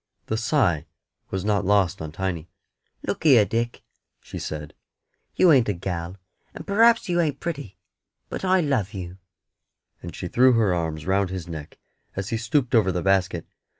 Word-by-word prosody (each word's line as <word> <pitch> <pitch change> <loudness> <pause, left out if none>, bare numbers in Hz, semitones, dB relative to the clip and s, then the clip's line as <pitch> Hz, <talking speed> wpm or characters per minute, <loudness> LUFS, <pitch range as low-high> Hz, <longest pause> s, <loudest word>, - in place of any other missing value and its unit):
The 110 - -2
sigh 110 - +1 0.4
was 95 0 -3
not 105 -1 +1
lost 100 -4 +2
on 80 -1 -5
Tiny. 85 -1 -4 0.6
"Look - - -3
here, 130 -9 +6
Dick," 115 +2 -2 0.4
she - - -8
said, 75 0 -6 0.6
"you 180 - +6
ain't 130 -7 +4
a - - +2
gal, 90 0 -5 0.4
and - - -8
p'r'aps 230 +3 +4
you 175 -1 +2
ain't 150 -4 -1
pretty, 145 - -5 0.5
but - - -6
I 185 -1 +3
love 120 - -1
you;" 90 0 -7 0.8
and 85 - -8
she 90 - -5
threw 125 +7 +5
her 110 -5 +3
arms 80 -3 -3
round 95 0 +1
his 95 -2 -5
neck 80 -3 -8 0.4
as 95 +1 -3
he 115 - -1
stooped 120 +3 0
over 105 -5 +4
the 90 -1 -2
basket. 95 -3 +1
100 Hz, 170 wpm, -24 LUFS, 90-125 Hz, 0.8 s, here